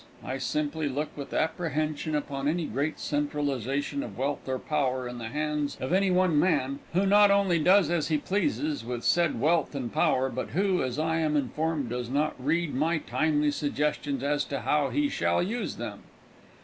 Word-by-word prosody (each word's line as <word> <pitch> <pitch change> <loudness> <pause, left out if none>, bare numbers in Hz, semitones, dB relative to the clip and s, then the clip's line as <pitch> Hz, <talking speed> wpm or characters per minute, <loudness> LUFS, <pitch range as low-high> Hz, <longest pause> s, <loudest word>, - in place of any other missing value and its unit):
I 130 +1 -3
simply 150 +2 -1
look 145 +3 -3
with 140 -2 -7
apprehension 155 -2 -1
upon 140 -1 -2
any 165 +2 0
great 145 +6 -2
centralization 145 - -1
of 290 - -7
wealth 135 0 -2
or 130 - 0
power 130 -4 -1
in 120 0 -7
the 115 - -5
hands 150 +2 -2
of 130 +6 -2
any 195 +1 +3
one 180 -4 +3
man 140 -5 +1
who 190 +3 +2
not 205 +1 +6
only 200 -4 +3
does 180 +1 +4
as 170 -3 +1
he 155 - +2
pleases 290 - -1
with 120 -1 -4
said 170 -2 +2
wealth 160 -1 +2
and 125 -4 -4
power, 130 +1 +2
but 130 0 -4
who, 195 -2 +2
as 130 0 -2
I 160 +1 0
am 155 -2 +1
informed, 145 0 -1
does 125 -1 -3
not 150 +3 +1
read 165 +2 0
my 160 +5 +1
timely 150 -1 +1
suggestions 145 -2 -1
as 145 +1 +1
to 140 - -4
how 150 -2 +1
he 295 0 +1
shall 280 - +1
use 230 +6 -3
them. - - -6
150 Hz, 185 wpm, -28 LUFS, 140-170 Hz, -, not